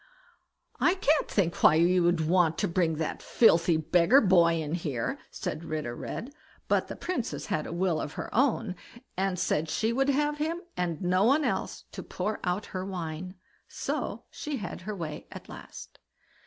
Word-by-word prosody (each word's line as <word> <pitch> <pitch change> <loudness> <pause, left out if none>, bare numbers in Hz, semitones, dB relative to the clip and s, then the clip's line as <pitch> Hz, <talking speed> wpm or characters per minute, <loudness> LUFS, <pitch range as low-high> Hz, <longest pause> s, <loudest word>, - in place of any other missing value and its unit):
"I 355 - +4
can't 310 -5 +2
think 175 -5 0
why 155 - +7
you 175 +2 +4
should 165 -3 +1
want 170 -2 +3
to - - +1
bring 170 -2 +1
that 155 0 -3
filthy 170 -7 +4
beggar 175 - +5
boy 170 -6 +4
in 155 -1 -3
here", 145 -9 -2
said 155 - -5
Ritter 155 -7 -4
Red; 255 - -6 0.3
but - - +2
the - - -6
Princess 355 -10 -3
had 155 - -2
a - - -6
will 175 -2 0
of 145 - -5
her - - -6
own, 230 -5 +2 0.4
and 190 0 0
said 160 -2 0
she 220 +7 0
would 270 +3 +2
have 295 +1 +1
him, 330 +3 -2
and 175 -1 -2
no 185 +2 +3
one 280 +6 +4
else, - - -2
to - - -6
pour 205 +4 -3
out 180 +3 -1
her 185 -1 -2
wine; 180 -1 -5 0.3
so - - -3
she 300 -2 -4
had 185 -5 -6
her 210 - -2
way 160 -5 -6
at - - -10
last. - - -11
180 Hz, 180 wpm, -28 LUFS, 165-225 Hz, 0.4 s, why